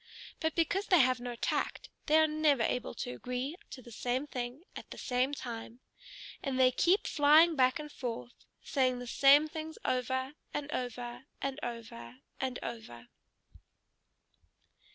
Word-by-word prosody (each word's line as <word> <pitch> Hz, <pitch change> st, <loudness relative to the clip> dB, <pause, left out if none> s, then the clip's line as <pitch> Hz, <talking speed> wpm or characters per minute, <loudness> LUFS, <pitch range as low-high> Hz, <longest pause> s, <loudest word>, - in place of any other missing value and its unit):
But 320 Hz, -1 st, -1 dB
because 345 Hz, +4 st, +1 dB
they 365 Hz, -, +6 dB
have 255 Hz, -4 st, +4 dB
no 245 Hz, 0 st, -5 dB
tact, -, -, -2 dB, 0.2 s
they 310 Hz, 0 st, +5 dB
are 315 Hz, -, +6 dB
never 305 Hz, -5 st, +2 dB
able 245 Hz, +1 st, -1 dB
to 125 Hz, -, -4 dB
agree 250 Hz, -, -4 dB
to 255 Hz, -, -9 dB
the 235 Hz, -, -12 dB
same 250 Hz, +5 st, -1 dB
thing 250 Hz, +1 st, -5 dB
at -, -, -9 dB
the -, -, -9 dB
same 255 Hz, +1 st, 0 dB
time. 235 Hz, -3 st, -6 dB, 0.6 s
And 270 Hz, -2 st, -2 dB
they 255 Hz, -1 st, +6 dB
keep 355 Hz, -, +3 dB
flying 310 Hz, +3 st, +5 dB
back 255 Hz, -2 st, +3 dB
and 300 Hz, -1 st, -7 dB
forth, 240 Hz, -2 st, -5 dB, 0.3 s
saying 255 Hz, -3 st, +1 dB
the 245 Hz, -, -6 dB
same 280 Hz, +5 st, +6 dB
things 315 Hz, 0 st, -7 dB
over, 260 Hz, +2 st, -1 dB, 0.2 s
and 295 Hz, 0 st, -3 dB
over, 245 Hz, 0 st, -4 dB
and 275 Hz, +1 st, -3 dB
over, 215 Hz, -, -7 dB, 0.2 s
and 260 Hz, -2 st, -2 dB
over.... 120 Hz, -, -8 dB
255 Hz, 155 wpm, -32 LUFS, 245-295 Hz, 0.6 s, they